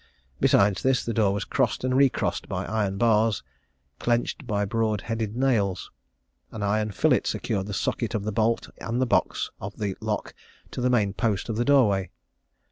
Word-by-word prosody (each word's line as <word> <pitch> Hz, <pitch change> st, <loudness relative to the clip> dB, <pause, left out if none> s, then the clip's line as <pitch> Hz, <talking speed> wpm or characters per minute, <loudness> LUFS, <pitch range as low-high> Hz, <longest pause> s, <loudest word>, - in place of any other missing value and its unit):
Besides 100 Hz, -1 st, +3 dB
this, 130 Hz, -2 st, +1 dB
the 115 Hz, -, -2 dB
door 105 Hz, -3 st, +3 dB
was 100 Hz, 0 st, -2 dB
crossed 130 Hz, -3 st, 0 dB
and 130 Hz, 0 st, +1 dB
recrossed 135 Hz, -1 st, +1 dB
by -, -, -3 dB
iron 105 Hz, -3 st, -1 dB
bars, 110 Hz, -2 st, +2 dB, 0.6 s
clenched 120 Hz, +3 st, -1 dB
by 105 Hz, -1 st, 0 dB
broad 110 Hz, -1 st, 0 dB
headed 115 Hz, -2 st, -3 dB
nails. 115 Hz, -8 st, 0 dB, 0.6 s
An 105 Hz, -, -5 dB
iron 105 Hz, +1 st, +1 dB
fillet 100 Hz, -, +2 dB
secured 95 Hz, 0 st, -2 dB
the 105 Hz, -, -5 dB
socket 115 Hz, +2 st, -1 dB
of 105 Hz, -, -1 dB
the 110 Hz, -, -2 dB
bolt 115 Hz, +2 st, +1 dB
and 115 Hz, +2 st, -2 dB
the 130 Hz, -, +3 dB
box 120 Hz, -, 0 dB
of -, -, -7 dB
the 100 Hz, -3 st, -2 dB
lock -, -, -3 dB, 0.4 s
to -, -, -5 dB
the 125 Hz, -, +2 dB
main 105 Hz, -6 st, +2 dB
post 110 Hz, -1 st, -1 dB
of 110 Hz, -, -1 dB
the 120 Hz, +2 st, 0 dB
door 140 Hz, -4 st, +5 dB
way. 95 Hz, -2 st, -1 dB
110 Hz, 185 wpm, -26 LUFS, 100-120 Hz, 0.6 s, door